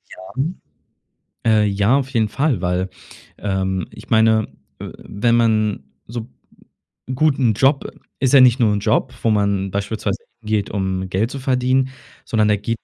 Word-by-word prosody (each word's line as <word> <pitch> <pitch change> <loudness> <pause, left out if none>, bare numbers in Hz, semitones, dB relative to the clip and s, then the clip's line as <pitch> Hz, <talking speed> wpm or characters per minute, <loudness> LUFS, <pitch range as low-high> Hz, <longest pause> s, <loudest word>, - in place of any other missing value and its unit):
Ja. 95 - -12 1.1
Äh, 110 -2 +4
ja, 100 +5 +2
auf 135 -2 -2
jeden 115 -5 +1
Fall, 135 - 0
weil 90 +1 -1 0.5
ähm, 95 -2 -2
ich - - -13
meine, 110 -1 +4 0.3
äh, - - -7
wenn 115 +3 0
man 110 -6 +1 0.2
so 115 0 -6 0.9
Gut, 150 +1 +2
'n 120 -4 +3
Job, 135 +3 +3 0.3
ist 130 -1 +1
ja 140 - +9
nicht 125 0 +5
nur 115 -4 +4
'n 105 - 0
Job, 115 +5 0
wo 115 - +3
man 100 -2 +1
beispielsweise 100 +1 -2 0.2
hingeht, 105 -3 -1
um 95 -2 -2
Geld 100 +5 0
zu 140 - -5
verdienen, 130 0 +1 0.4
sondern 110 -2 +1
da 105 - +4
geht 115 +3 -3
110 Hz, 160 wpm, -20 LUFS, 100-125 Hz, 1.1 s, ja